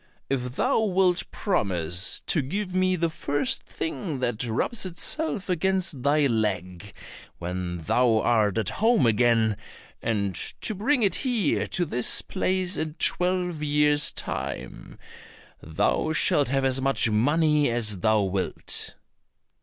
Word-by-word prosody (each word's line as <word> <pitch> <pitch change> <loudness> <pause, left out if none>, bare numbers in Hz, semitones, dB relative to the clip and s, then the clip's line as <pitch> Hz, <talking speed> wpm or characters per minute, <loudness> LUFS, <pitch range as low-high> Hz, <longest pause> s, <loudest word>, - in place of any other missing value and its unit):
"If 125 -2 -2
thou 255 - +1
wilt 190 -4 +1
promise 90 - +1
to 155 - -1
give 185 +8 -4
me 185 0 +2
the 170 -1 -1
first 155 - -1
thing 270 - -5
that 125 -3 -2
rubs 120 - -1
itself 200 - -3
against 185 -4 0
thy 145 +2 +2
leg 100 -6 -2 0.5
when 90 0 -4
thou 115 +8 +2
art 110 -3 +2
at 110 - 0
home 225 - +2
again, 115 -2 +2 0.4
and 100 -4 -1 0.3
to 220 - +1
bring 235 +6 +1
it 200 - +2
here 235 - 0
to 175 - -1
this 125 -5 -1
place 185 -1 -1
in 155 -1 -3
twelve 180 -3 0
years' 150 0 +2
time, - - -6 0.6
thou 80 - 0
shalt 145 -2 +2
have 135 +1 0
as 130 0 +1
much 135 -4 +2
money 150 +6 +2
as 110 -5 0
thou 110 +1 +2
wilt." 95 0 -2
145 Hz, 130 wpm, -25 LUFS, 110-185 Hz, 0.6 s, me